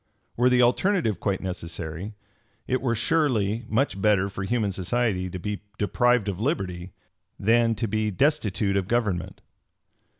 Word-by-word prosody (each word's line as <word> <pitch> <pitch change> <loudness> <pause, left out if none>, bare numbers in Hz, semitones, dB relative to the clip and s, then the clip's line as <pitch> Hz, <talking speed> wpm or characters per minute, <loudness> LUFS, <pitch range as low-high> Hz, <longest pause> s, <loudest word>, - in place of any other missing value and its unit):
Were 125 +2 +4
the 125 0 +4
alternative 125 - +2
quite 100 -2 -1
necessary, 85 +1 -5 0.5
it 130 - 0
were 120 -3 0
surely 115 -5 +1
much 110 -4 0
better 100 -2 +3
for 95 - -6
human 110 -1 0
society 95 0 -1
to 90 - -5
be 105 +3 -4 0.2
deprived 120 +1 +2
of 100 -2 -3
liberty 95 - -2 0.5
than 115 +2 +3
to 115 +2 -2
be 110 +1 0
destitute 105 - +1
of 95 -2 -1
government. 105 -7 -1
105 Hz, 140 wpm, -25 LUFS, 95-120 Hz, 0.5 s, Were